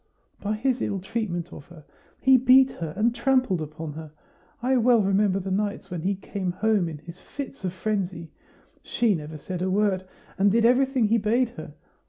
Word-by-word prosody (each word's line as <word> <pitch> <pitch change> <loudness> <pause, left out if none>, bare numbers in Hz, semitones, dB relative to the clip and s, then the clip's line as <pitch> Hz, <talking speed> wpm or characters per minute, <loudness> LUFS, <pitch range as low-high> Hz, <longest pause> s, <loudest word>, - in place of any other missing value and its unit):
"By 210 +1 -2
his 250 +2 0
ill 200 - -1
treatment 185 -4 -4
of 145 - -10
her; 165 -4 -15 0.3
he 265 -1 +5
beat 260 +1 +6
her 165 -2 -5
and 230 +2 +2
trampled 255 -8 +1
upon 155 0 -6
her. 155 0 -9 0.5
I 255 +2 +1
well 235 -2 +4
remember 195 0 +2
the 190 0 -5
nights 200 0 -2
when 175 -3 -4
he 195 +4 0
came 190 -1 -4
home 205 -2 +1
in 155 - -7
his 170 +4 -12
fits 275 -1 -8
of 185 - -1
frenzy. 185 -3 -3 0.5
She 235 -3 +1
never 155 -2 -5
said 180 +4 -6
a 185 - 0
word, 195 -1 +1 0.4
and 200 +1 +4
did 230 +2 +3
everything 260 0 +3
he 230 +1 +3
bade 235 +4 +1
her. 240 - -10
200 Hz, 190 wpm, -25 LUFS, 175-235 Hz, 0.5 s, beat